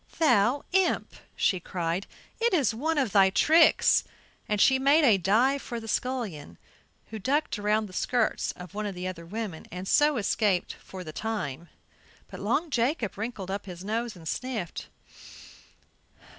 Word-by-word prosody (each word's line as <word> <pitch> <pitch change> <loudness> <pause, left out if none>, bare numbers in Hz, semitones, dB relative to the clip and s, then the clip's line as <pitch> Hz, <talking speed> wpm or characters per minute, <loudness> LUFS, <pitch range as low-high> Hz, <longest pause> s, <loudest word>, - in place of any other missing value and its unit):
"Thou 275 -4 +3
imp," 380 -1 +1 0.2
she 185 - +1
cried, 175 +1 -3 0.3
"it 465 -4 +2
is 280 -8 +2
one 310 +8 -1
of 260 -7 +1
thy 195 -1 +5
tricks," 320 - +5 0.5
and 210 -1 0
she 265 +5 +5
made 285 +4 +4
a 220 -8 +5
dive 245 +10 +2
for 235 - -5
the 225 - -10
scullion, 210 - -3 0.5
who 220 - -5
ducked 275 +2 0
around 210 +1 +1
the 190 - -12
skirts 240 +3 0
of 180 0 -11
one 210 0 -3
of 200 - -5
the 180 +1 -4
other 170 -2 -7
women 205 -4 -5
and 180 +2 -6
so 295 +3 +4
escaped 200 -3 0
for 185 -1 -10
the 155 -2 -8
time; 175 -8 -4 0.6
but - - -8
Long 325 -1 -1
Jacob 240 - 0
wrinkled 205 -3 -5
up 200 0 -4
his 180 -1 -8
nose 230 +1 -2
and 165 -2 -11
sniffed. 225 -4 -4
215 Hz, 160 wpm, -27 LUFS, 185-260 Hz, 0.6 s, thy